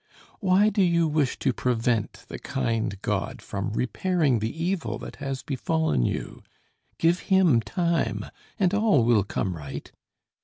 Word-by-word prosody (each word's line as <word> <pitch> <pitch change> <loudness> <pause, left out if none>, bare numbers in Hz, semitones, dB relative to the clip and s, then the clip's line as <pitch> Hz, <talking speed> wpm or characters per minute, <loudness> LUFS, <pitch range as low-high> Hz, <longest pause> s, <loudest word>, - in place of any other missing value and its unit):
Why 195 +1 +4
do 205 -1 +1
you 170 -2 +3
wish 150 -4 0
to 130 - 0
prevent 115 -3 -1
the - - -7
kind 110 -4 -2
God - - -2
from 100 +2 -4
repairing 145 +1 +1
the 110 +1 -1
evil 185 -1 -1
that - - -9
has 135 -2 -4
befallen 145 - 0
you? - - -4 0.6
Give 170 +2 +3
Him 185 - +4
time, 135 - -1 0.3
and 190 -1 +2
all 205 - +4
will 115 -3 +4
come 95 -1 -2
right. 75 -4 -8
140 Hz, 145 wpm, -26 LUFS, 115-180 Hz, 0.6 s, Why